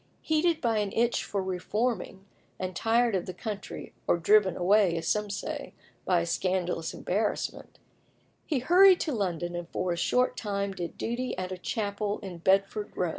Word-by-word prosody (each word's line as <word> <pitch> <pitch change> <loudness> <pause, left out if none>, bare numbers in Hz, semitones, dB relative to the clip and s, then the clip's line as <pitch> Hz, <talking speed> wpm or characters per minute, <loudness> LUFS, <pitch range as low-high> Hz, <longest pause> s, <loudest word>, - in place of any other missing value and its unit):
Heated 315 +1 +2
by 230 -3 +1
an 205 -2 -1
itch 235 +1 +1
for 200 -2 -2
reforming, 195 +2 -2 0.3
and 185 -1 -4
tired 230 +3 +2
of 180 - -2
the 185 - -6
country, 205 +1 -6
or - - +4
driven 195 +2 +4
away, 185 -1 +3
as 165 - -4
some 210 -1 +1
say, 200 - -5 0.3
by 180 -2 +3
a - - -2
scandalous 175 -1 -1
embarrassment, 210 +3 -2 0.7
he 300 - +1
hurried 360 +8 +6
to 310 - -1
London, 175 -5 -2
and 175 0 -5
for 180 - -2
a - - 0
short 250 +8 +2
time 200 -2 -2
did 175 -3 -6
duty 245 +2 -3
at 185 0 -4
a - - -2
chapel 205 0 -2
in 180 -3 -7
Bedford 195 +3 +1
Row. 180 - +1
200 Hz, 175 wpm, -28 LUFS, 180-225 Hz, 0.7 s, hurried